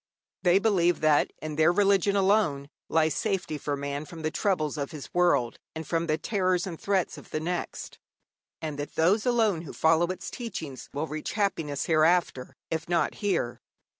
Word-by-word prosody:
They 180 0 +5
believe 185 -5 +2
that 155 -1 +3
in 155 -1 -5
their 160 +2 +5
religion 200 +1 +3
alone 190 -8 +2 0.2
lies 160 -1 +2
safety 185 -8 -2
for 145 0 -2
man 140 +1 -4
from 160 +1 -10
the 155 - 0
troubles 160 -8 0
of 140 -2 -3
this 150 -3 -9
world 175 -10 +2 0.2
and 160 0 -5
from 165 0 0
the 155 0 +1
terrors 185 +1 0
and 170 -4 -7
threats 195 -3 0
of - - -16
the 155 - -2
next, 175 +3 -4 0.6
and 150 -2 -4
that 145 - -5
those 195 +9 +3
alone 220 -8 +2
who 170 - -9
follow 165 +2 +3
its 185 +1 -5
teaching 165 - -6 0.2
will 145 +3 -2
reach 155 -1 -5
happiness 165 -9 -1
hereafter, 160 -4 +2 0.2
if 160 +1 -3
not 175 -1 +1
here. 180 - -1
165 Hz, 175 wpm, -27 LUFS, 155-190 Hz, 0.6 s, They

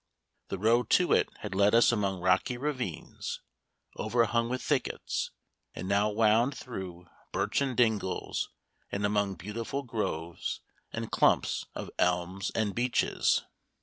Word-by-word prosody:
The 95 - -3
road 115 +4 +3
to - - +2
it - - +3
had - - -4
led 100 +3 +4
us 120 - +6
among 100 -5 0
rocky 95 +7 +2
ravines 125 - -4 0.6
overhung 115 +1 +1
with 130 +1 -2
thickets, 140 -4 -1 0.5
and 90 - -5
now 100 +2 +3
wound 115 +5 +3
through 90 -7 -7 0.3
birchen 135 -3 0
dingles 110 -6 +1 0.4
and 100 +1 -1
among 100 -1 +1
beautiful 110 +9 -4
groves 85 -9 -3 0.3
and - - -4
clumps - - +2
of - - -5
elms 90 +2 +1
and 105 -3 +1
beeches. 120 +1 +2
105 Hz, 125 wpm, -30 LUFS, 95-120 Hz, 0.6 s, us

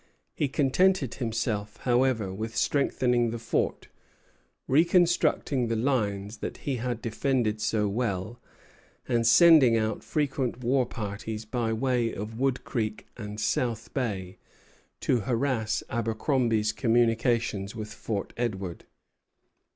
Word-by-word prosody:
He 145 - 0
contented 145 +2 +2
himself, 110 -3 -2
however, 120 -6 +1
with 110 +3 -5
strengthening 125 -4 +1
the 115 - -4
fort, 115 0 -2 0.8
reconstructing 165 -4 +3
the 115 - -1
lines 110 -4 -1
that - - -5
he 135 -3 -3
had 120 -1 -3
defended 115 -2 0
so 105 -1 +1
well, 110 +1 -2 0.7
and 115 -2 +2
sending 130 -2 +7
out 110 -1 -1
frequent 135 -4 -2
war 125 +1 +2
parties 110 -1 -5
by 115 0 -1
way 120 0 0
of 110 +3 -6
Wood 135 -1 0
Creek 110 -4 -3
and 105 -2 -7
South 115 +1 -1
Bay, 95 -8 -3 0.6
to 125 - +2
harass 115 0 -1
Abercromby's 115 -1 0
communications 115 -4 +1
with 110 -1 -6
Fort 105 -3 -4
Edward. 100 -7 -3
115 Hz, 115 wpm, -27 LUFS, 110-130 Hz, 0.8 s, sending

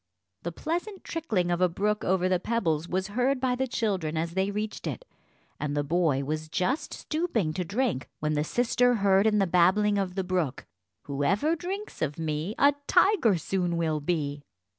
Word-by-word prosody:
The 170 - -4
pleasant 350 - -4
trickling 215 - -1
of 175 +1 0
a 180 - +4
brook 210 +5 -1
over 185 0 +2
the 185 -1 +2
pebbles 175 -7 -1
was 190 +2 -1
heard 250 +5 +1
by 255 -1 +1
the 265 +1 -1
children 190 -10 -1
as 165 +1 -1
they 190 +3 0
reached 210 +1 -4
it, - - -5 0.5
and 145 -1 -2
the 145 - +1
boy 150 -3 +1
was 155 +2 -3
just 240 - -1
stooping 305 - -1
to 180 - -2
drink, 205 - -1
when 155 0 0
the 150 0 +1
sister 245 +6 +2
heard 195 -1 +4
in 210 -1 +3
the 195 - +3
babbling 190 +4 +3
of 185 -2 -2
the 190 - -1
brook: 180 -7 -1 0.4
"Whoever 190 - +1
drinks 385 +6 -6
of 150 -2 -1
me, 160 +5 -2
a 285 +1 +5
tiger 355 - +4
soon 175 +1 -1
will 160 -2 0
be." 145 -2 -2
190 Hz, 185 wpm, -27 LUFS, 160-235 Hz, 0.5 s, a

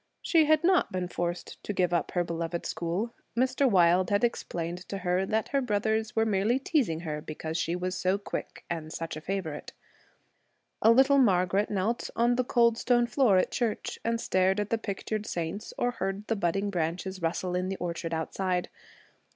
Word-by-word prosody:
She 325 -3 +4
had 310 +1 +3
not 360 -1 +3
been 185 -1 -2
forced 175 0 -4
to 205 - -3
give 180 -2 +1
up 170 - +1
her 175 - +2
beloved 170 0 -3
school. 180 +8 -2 0.2
Mr. 260 +2 +3
Wilde 180 -2 +4
had 205 +3 +2
explained 175 -7 -2
to 200 - -3
her 185 0 0
that 220 +2 0
her 275 -1 +1
brothers 220 -1 0
were 225 0 +3
merely 215 +3 +2
teasing 265 - 0
her 150 -3 -4
because 160 +1 -6
she 165 +1 0
was 180 +1 -2
so 185 +1 +1
quick 200 - -6
and 160 -2 -4
such 165 -1 -4
a 155 - -7
favorite. 170 -4 -4 1.1
A 220 - +6
little 265 +4 +6
Margaret 195 -3 +3
knelt 210 +4 -1
on 240 +1 +3
the 255 - +1
cold 235 -1 +3
stone 240 -1 +3
floor 235 -5 +3
at 185 - +2
church 230 -4 -2
and 230 0 0
stared 190 -1 +2
at 205 0 -2
the 230 - +1
pictured 215 +1 -4
saints 170 +4 -4
or 245 - +1
heard 195 -2 -3
the 225 - 0
budding 195 +1 0
branches 180 +2 -2
rustle 175 +2 -1
in 185 +1 -1
the 195 - -3
orchard 170 -1 -4
outside. 180 +3 -1
195 Hz, 185 wpm, -28 LUFS, 175-230 Hz, 1.1 s, A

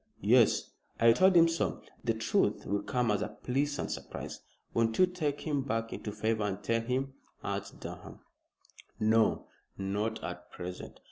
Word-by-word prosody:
"Yes! - - +4 0.3
I 115 0 +7
told 185 +8 +5
him 170 0 +8
so. 165 0 -1 0.2
The 115 -2 +1
truth 110 - +1
will 100 0 0
come 125 -4 0
as 105 - +1
a 105 0 -4
pleasant 140 +3 0
surprise." - - -6 0.3
"Won't 115 -1 +1
you 185 - +7
take 160 -6 -2
him 145 -3 0
back 115 -4 -2
into 105 - -5
favor 110 +1 0
and 100 -1 -2
tell 115 0 +1
him?" 130 +3 -1 0.3
urged - - -4
Durham. - - -8 0.8
"No! 110 +1 +3 0.3
not 105 +3 -2
at 90 0 -6
present. 90 0 -7
115 Hz, 155 wpm, -31 LUFS, 105-135 Hz, 0.8 s, him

